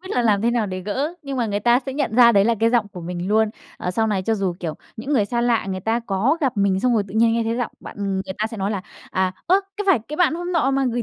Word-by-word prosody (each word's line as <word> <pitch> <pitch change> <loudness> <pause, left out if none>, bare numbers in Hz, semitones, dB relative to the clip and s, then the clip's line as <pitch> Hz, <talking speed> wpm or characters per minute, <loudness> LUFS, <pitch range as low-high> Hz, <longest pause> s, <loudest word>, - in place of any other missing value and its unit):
biết 375 - -10
là 245 - +1
làm 210 -3 +2
thế 235 - +3
nào 235 -3 0
để 185 -1 -4
gỡ, 265 - -2
nhưng 275 -2 -5
mà 240 -3 0
người 205 0 -2
ta 240 +2 +4
sẽ 270 - -3
nhận 270 -6 -2
ra 235 -1 +8
đấy 200 -1 +4
là 230 +2 +3
cái 230 - +4
giọng 235 -3 +2
của 185 -3 -9
mình 175 +2 -4
luôn. 220 0 +3 0.3
Ờ, 180 - -2
sau 220 +5 +1
này 200 -3 0
cho 225 +4 +1
dù, 195 -4 -1
kiểu, 160 -3 -3 0.2
những 265 +7 -4
người 225 -8 +3
xa 235 +3 -1
lạ, 235 -3 +1
người 190 -1 -3
ta 225 +5 0
có 210 +10 +1
gặp 265 -6 0
mình 195 -1 +2
xong 250 +1 +2
rồi 215 - +2
tự 190 - -10
nhiên 225 +1 +4
nghe 230 0 +1
thấy 225 +1 -1
giọng 245 -2 -2
bạn, - - -10 0.2
người 190 0 -3
ta 215 - +1
sẽ 225 - -8
nói 195 0 -1
là 200 -3 -3 0.3
"À, 185 0 0
ơ, 380 +3 +4 0.2
có 415 - -1
phải 380 -9 +5
cái 300 - -5
bạn 350 -2 +3
hôm 350 +2 -4
nọ 315 -6 +2
mà 275 0 +1
gửi 240 - -1
225 Hz, 320 wpm, -22 LUFS, 200-250 Hz, 0.3 s, ra